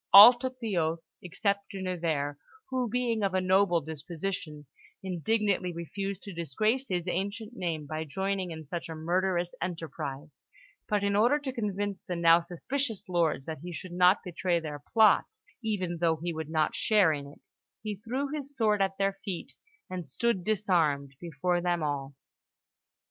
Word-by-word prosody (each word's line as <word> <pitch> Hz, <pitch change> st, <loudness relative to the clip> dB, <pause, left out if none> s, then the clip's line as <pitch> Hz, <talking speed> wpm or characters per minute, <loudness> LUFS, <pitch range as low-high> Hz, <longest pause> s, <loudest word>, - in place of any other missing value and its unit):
All 210 Hz, +5 st, +12 dB
took 255 Hz, +1 st, -5 dB
the 225 Hz, -5 st, -2 dB
oath 165 Hz, 0 st, 0 dB, 0.2 s
except 200 Hz, +2 st, -1 dB
De 195 Hz, -, -6 dB
Nevers, 165 Hz, -6 st, -1 dB, 0.4 s
who, 255 Hz, -2 st, 0 dB
being 235 Hz, -1 st, 0 dB
of 195 Hz, -2 st, +1 dB
a -, -, +4 dB
noble 185 Hz, -2 st, +3 dB
disposition, 160 Hz, 0 st, -5 dB, 0.4 s
indignantly 190 Hz, 0 st, 0 dB
refused 190 Hz, +3 st, -5 dB
to 200 Hz, -, -7 dB
disgrace 215 Hz, -, 0 dB
his 180 Hz, -1 st, -2 dB
ancient 205 Hz, +5 st, -3 dB
name 165 Hz, -7 st, -2 dB
by 155 Hz, +2 st, -4 dB
joining 190 Hz, +3 st, -2 dB
in 160 Hz, -1 st, -7 dB
such 170 Hz, +3 st, -5 dB
a 160 Hz, -, -5 dB
murderous 175 Hz, +2 st, 0 dB
enterprise; 150 Hz, -4 st, -5 dB, 0.5 s
but, 210 Hz, -2 st, +1 dB
in 200 Hz, 0 st, +1 dB
order 240 Hz, +8 st, +4 dB
to 280 Hz, -3 st, -5 dB
convince 205 Hz, -4 st, -2 dB
the 180 Hz, -, -4 dB
now 170 Hz, 0 st, +6 dB
suspicious 210 Hz, +6 st, -3 dB
lords 165 Hz, -6 st, +1 dB
that 160 Hz, -2 st, -5 dB
he 175 Hz, +4 st, -7 dB
should 175 Hz, +2 st, -6 dB
not 180 Hz, +2 st, +5 dB
betray 175 Hz, 0 st, 0 dB
their 150 Hz, -3 st, -6 dB
plot, 220 Hz, -, +4 dB, 0.3 s
even 185 Hz, -6 st, -1 dB
though 165 Hz, -1 st, +3 dB
he 170 Hz, +2 st, -4 dB
would 160 Hz, -1 st, -5 dB
not 155 Hz, -1 st, +1 dB
share 205 Hz, -7 st, +4 dB
in 140 Hz, -1 st, -5 dB
it, 140 Hz, -, -14 dB, 0.4 s
he 210 Hz, -2 st, -3 dB
threw 250 Hz, +7 st, -2 dB
his 285 Hz, -1 st, -6 dB
sword 210 Hz, -3 st, +3 dB
at 195 Hz, 0 st, +1 dB
their 195 Hz, 0 st, +1 dB
feet 190 Hz, -5 st, -5 dB, 0.3 s
and 180 Hz, -4 st, -5 dB
stood 195 Hz, -, 0 dB
disarmed 170 Hz, -9 st, +1 dB
before 175 Hz, +2 st, -1 dB
them 175 Hz, -2 st, 0 dB
all. 140 Hz, -2 st, -3 dB
180 Hz, 165 wpm, -29 LUFS, 165-205 Hz, 0.5 s, All